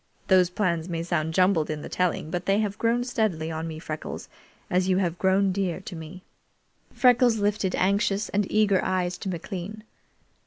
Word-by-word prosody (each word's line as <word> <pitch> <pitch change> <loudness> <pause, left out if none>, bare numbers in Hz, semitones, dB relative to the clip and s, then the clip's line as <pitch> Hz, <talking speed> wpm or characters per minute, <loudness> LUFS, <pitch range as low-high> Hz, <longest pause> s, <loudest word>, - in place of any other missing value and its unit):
Those 185 -2 +5
plans 180 -3 -1
may 165 -1 -2
sound 160 -2 -1
jumbled 185 -4 +3
in 155 -1 -4
the - - -6
telling, 180 -3 -1
but 175 0 -3
they 195 +1 +3
have 210 -2 -1
grown 235 +1 +2
steadily 205 -10 -1
on 160 +1 -4
me, 160 -1 -6
Freckles, 155 -1 -6 0.4
as 185 +1 +1
you 185 - +3
have 175 -3 -1
grown 190 +1 +3
dear 185 -3 -1
to 185 - -8
me." 165 +3 -9 0.7
Freckles 245 -1 +4
lifted 205 -2 0
anxious 200 +2 +1
and 205 -1 -1
eager 210 -3 +3
eyes 180 -1 0
to 195 - -4
McLean. 190 +4 -6
185 Hz, 180 wpm, -26 LUFS, 170-205 Hz, 0.7 s, Those